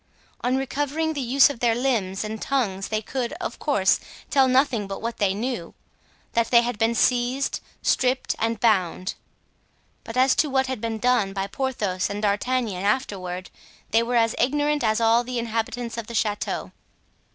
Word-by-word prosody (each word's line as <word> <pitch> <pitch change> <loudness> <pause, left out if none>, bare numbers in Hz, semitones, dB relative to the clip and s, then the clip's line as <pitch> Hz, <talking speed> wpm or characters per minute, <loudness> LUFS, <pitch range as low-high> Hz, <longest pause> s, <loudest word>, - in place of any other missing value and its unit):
On 250 +1 +2
recovering 290 +4 -1
the 285 - -3
use 270 +4 +5
of 240 - -9
their 235 -2 +2
limbs 225 -7 0
and 215 0 -5
tongues 205 -8 -1
they 215 0 -2
could, 250 +1 -3
of - - -5
course, - - +2 0.3
tell 270 -2 +5
nothing 255 -5 +2
but 195 - -5
what 230 +1 -4
they 195 -2 +1
knew—that 230 +1 -5
they 235 -1 +6
had 235 -3 -3
been 225 +1 +2
seized, 250 +3 +1 0.2
stripped 255 0 +1
and 225 0 0
bound. 185 -5 +1 0.9
But 225 - -7
as 260 +1 +5
to 300 - +3
what 265 0 +2
had 260 -4 -4
been 225 -1 -2
done 220 -4 +2
by 195 -1 -2
Porthos 205 -5 -2
and 205 0 -4
D'Artagnan 210 -1 0
afterward 190 -5 -2 0.4
they 225 - +4
were 240 +1 -1
as 230 -1 +3
ignorant 290 +3 +1
as 220 0 +2
all 230 +1 +4
the 250 0 -4
inhabitants 230 +1 -3
of 220 - -7
the 235 - -7
chateau. 210 -2 -1
235 Hz, 170 wpm, -24 LUFS, 210-255 Hz, 0.9 s, they